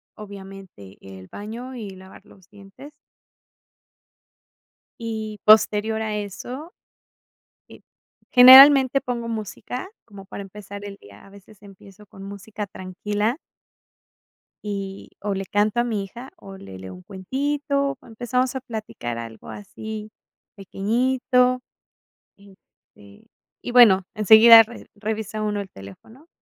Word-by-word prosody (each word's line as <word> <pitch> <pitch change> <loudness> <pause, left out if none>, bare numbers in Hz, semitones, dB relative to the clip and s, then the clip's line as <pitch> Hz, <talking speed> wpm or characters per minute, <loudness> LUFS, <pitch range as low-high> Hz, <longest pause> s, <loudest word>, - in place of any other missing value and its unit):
obviamente 195 - -12
el 95 -1 -12
baño, 235 +5 -8
y 210 -5 -7
lavar 190 0 -15
los 190 0 -21
dientes 205 +8 -15 2.1
y 220 -2 -6
posterior 215 +1 +4
a 215 -1 -3
eso, 245 - -7 1.0
eh, - - -15 0.5
generalmente 265 +1 +9
pongo 235 -2 -4
música 225 - -6 0.2
como 200 -3 -13
para 200 - -9
empezar 200 +1 -10
el 200 -1 -8
día. 100 - -17
A - - -17
veces 200 +1 -18
empiezo 200 +1 -16
con 195 0 -14
música 200 +1 -8
tranquila. 205 - -3 1.3
Y 195 -1 -6
o, 205 -1 -3
le 195 0 -4
canto 210 +4 0
a - - +1
mi 215 -4 -2
hija, 240 +7 -11
o, 195 -11 -12
le 95 - -12
leo 95 -1 -10
un 90 - -14
cuentito, 280 - -2
o, - - -20
empezamos 250 +3 -2
a - - -3
platicar 215 - -7
algo 115 -1 -10
así 215 +1 -8 0.5
pequeñito, 250 +5 0 0.8
este, 190 - -21 0.4
y 245 - -5
bueno, 215 -6 +6
enseguida 220 +2 +8
re 235 +2 -13
revisa 215 0 -5
uno 210 -1 -2
el 195 - -10
teléfono, 220 - -15
210 Hz, 125 wpm, -22 LUFS, 195-240 Hz, 2.1 s, generalmente